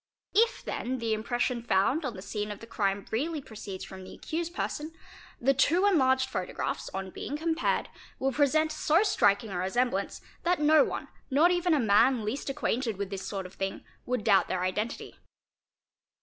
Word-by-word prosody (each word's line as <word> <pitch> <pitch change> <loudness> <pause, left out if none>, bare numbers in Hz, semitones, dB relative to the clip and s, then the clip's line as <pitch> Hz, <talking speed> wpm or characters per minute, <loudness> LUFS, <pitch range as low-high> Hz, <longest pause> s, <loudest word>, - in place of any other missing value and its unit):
If 465 +3 +2
then 260 +2 -2
the 230 -2 -1
impression 240 +2 -1
found 235 - +2
on 245 -4 -3
the 185 - -8
scene 210 0 -3
of 205 - -5
the - - -10
crime 200 -3 -1
really 300 +8 -1
proceeds 210 -7 -8
from 190 0 -10
the - - -10
accused 340 +2 -4
person, 310 +2 -3 0.5
the 270 +3 +3
two 330 +8 +3
enlarged 260 -9 +3
photographs 185 -8 -3
on 190 0 -5
being 290 - -5
compared 325 +1 0 0.3
will 270 0 0
present 305 +3 +2
so 310 +4 +3
striking 205 - +2
a 180 - -3
resemblance 245 +8 0 0.2
that 350 0 +1
no 305 +1 +6
one, - - -4 0.2
not 305 +6 +5
even 350 -2 +2
a - - +2
man 225 +1 +4
least 265 +7 -3
acquainted 250 -5 -1
with 200 0 -4
this 195 -1 -4
sort 195 -2 -4
of 185 - -10
thing, 195 0 -4 0.2
would 250 -3 -1
doubt 200 -3 +4
their 180 -1 -1
identity. 210 +5 -3
250 Hz, 180 wpm, -29 LUFS, 205-305 Hz, 0.5 s, no